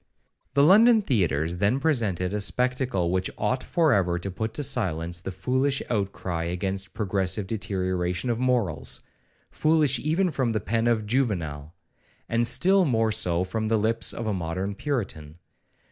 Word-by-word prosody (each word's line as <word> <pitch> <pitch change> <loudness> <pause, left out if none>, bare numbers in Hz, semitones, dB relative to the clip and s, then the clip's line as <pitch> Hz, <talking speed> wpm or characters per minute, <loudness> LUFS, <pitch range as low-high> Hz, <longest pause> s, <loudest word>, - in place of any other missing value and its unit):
The 140 - +5
London 220 +6 +6
theatres 85 - 0
then 105 +8 +1
presented 110 - 0
a 105 - -1
spectacle 125 -6 0
which 95 +1 0
ought 130 - -1
for 160 -4 +2
ever 90 -3 +1
to 95 +3 -5
put 110 +4 -3
to 145 - -2
silence 85 - -1
the 95 - -5
foolish 130 +8 0
outcry 95 -5 -2
against 95 +2 -3
progressive 95 -1 -1
deterioration 95 -1 -2
of 115 - -2
morals,—foolish 130 - -1
even 165 +6 +1
from 130 -5 0
the 110 - 0
pen 115 +1 -1
of 110 -3 +1
Juvenal, 90 - -2 0.5
and 115 +1 +1
still 190 +10 +4
more 115 -7 +1
so 90 -5 +1
from 110 +4 -3
the 110 0 +2
lips 115 +2 +1
of 115 - -5
a 110 - 0
modern 90 +2 -3
Puritan. 100 - -4
105 Hz, 150 wpm, -25 LUFS, 90-125 Hz, 0.5 s, London